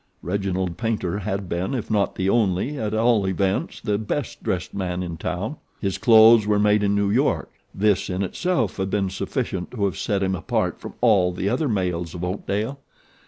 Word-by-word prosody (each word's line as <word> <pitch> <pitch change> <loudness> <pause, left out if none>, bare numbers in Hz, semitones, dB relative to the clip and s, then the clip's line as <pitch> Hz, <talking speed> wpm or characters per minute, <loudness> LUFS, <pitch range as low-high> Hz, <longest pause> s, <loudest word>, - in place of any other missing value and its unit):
Reginald 95 -1 -2
Paynter 105 -4 -1
had 95 0 -3
been, 90 +9 -2
if 115 -3 -4
not 105 -2 +1
the 95 - -1
only, 105 +5 +1
at 105 -1 -2
all 110 -3 +3
events 95 +1 -1
the 105 -1 -1
best 110 +4 -3
dressed 90 -1 -2
man 90 -2 -2
in 85 -2 -5
town. 95 - -4 0.2
His 95 -3 -2
clothes 110 -1 +7
were 105 -1 +3
made 105 0 +3
in 100 0 +2
New 100 -1 +1
York. - - +1 0.2
This 100 -1 +1
in 95 +1 -1
itself 130 - -1
had 95 0 -1
been 95 -1 0
sufficient 95 -2 -3
to 105 -5 -1
have 95 0 -2
set 100 -3 0
him 95 0 0
apart 95 - -1
from - - -9
all 100 -7 +4
the 95 +2 -2
other 150 +5 0
males 90 -5 -1
of 90 - -5
Oakdale. 105 +7 -2
100 Hz, 190 wpm, -23 LUFS, 95-110 Hz, 0.2 s, clothes